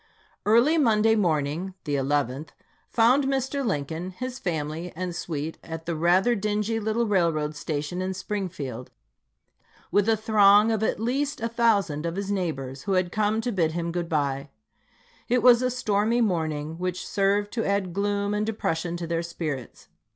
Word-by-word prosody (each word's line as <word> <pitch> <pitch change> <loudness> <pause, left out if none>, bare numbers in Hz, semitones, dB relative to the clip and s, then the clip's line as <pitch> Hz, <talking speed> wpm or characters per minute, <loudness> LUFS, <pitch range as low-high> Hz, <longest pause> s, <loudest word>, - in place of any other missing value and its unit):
Early 245 +10 +5
Monday 225 -4 +4
morning 170 -2 0
(the 145 - -3
11th) 140 +1 -1 0.4
found 245 +5 +4
Mr. 270 +1 -1
Lincoln, 165 - -2
his 255 +7 -6
family, 160 0 -3
and 180 0 -4
suite 160 -2 -4
at 160 0 -7
the 170 - -2
rather 180 +8 +3
dingy 210 +1 -1
little 220 +2 0
railroad 165 -7 +1
station 150 +4 -3
in 190 0 -2
Springfield, 175 - -5 1.0
with 205 +2 +3
a 225 - +3
throng 210 0 +5
of 220 -2 0
at 220 - 0
least 275 +6 -1
a 230 - -1
thousand 205 -10 +1
of 165 - -3
his 200 0 -3
neighbors 140 -9 -3
who 200 - 0
had 185 -1 +1
come 215 +2 +1
to 245 - -2
bid 165 -6 +1
him 170 0 -2
good 170 -1 -3
bye. 140 -2 -1 0.8
It 245 +1 +2
was 245 -1 +7
a 255 - +1
stormy 225 -2 +1
morning, 160 -6 -1
which 180 0 -3
served 200 +1 +1
to 230 - -1
add 200 -3 -1
gloom 200 +1 0
and 210 0 0
depression 175 -6 -2
to 170 - -4
their 165 0 -1
spirits. 155 -6 -6
190 Hz, 165 wpm, -26 LUFS, 160-220 Hz, 1.0 s, was